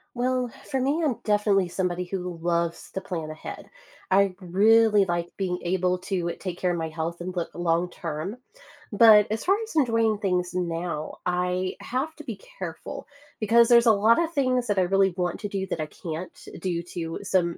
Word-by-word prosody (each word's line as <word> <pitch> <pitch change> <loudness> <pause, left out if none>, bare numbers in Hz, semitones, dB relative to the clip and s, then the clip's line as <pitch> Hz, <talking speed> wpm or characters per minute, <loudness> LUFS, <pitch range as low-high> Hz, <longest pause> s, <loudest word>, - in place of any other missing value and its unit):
Well, 250 0 0 0.2
for 265 - +1
me, 290 +6 +1
I'm 270 -7 +1
definitely 205 -3 +2
somebody 180 0 -2
who 180 -2 -4
loves 170 0 -1
to 190 - -3
plan 165 -5 -5
ahead. 155 - -8 0.4
I 195 0 +4
really 210 +3 +4
like 175 -1 -2
being 180 -2 -1
able 180 0 0
to 180 -2 -2
take 180 -3 -5
care 180 -1 +1
of 175 - -1
my 160 -1 -3
health 165 +2 -4
and 185 +1 -5
look 170 - -2
long 175 +1 0
term, 165 +6 -5 0.5
but 210 -1 +7
as 220 - -2
far 385 +2 +4
as 445 -6 -9
enjoying 230 -6 +2
things 180 -3 0
now, 170 -3 -3
I 180 +1 0
have 275 +6 -3
to - - -10
be - - -7 0.2
careful - - -6 0.3
because 230 +2 +5
there's 235 0 +6
a 230 - +7
lotta 230 +11 +4
things 255 -4 +1
that 205 -2 +1
I - - +4
really 195 +1 +3
want 180 -1 -2
to 205 - -2
do 195 -1 -3
that 175 - -3
I 155 - -1
can't 165 +2 -7 0.2
due 170 -1 -2
to 165 -2 -4
some 180 -4 0
185 Hz, 190 wpm, -26 LUFS, 175-220 Hz, 0.5 s, but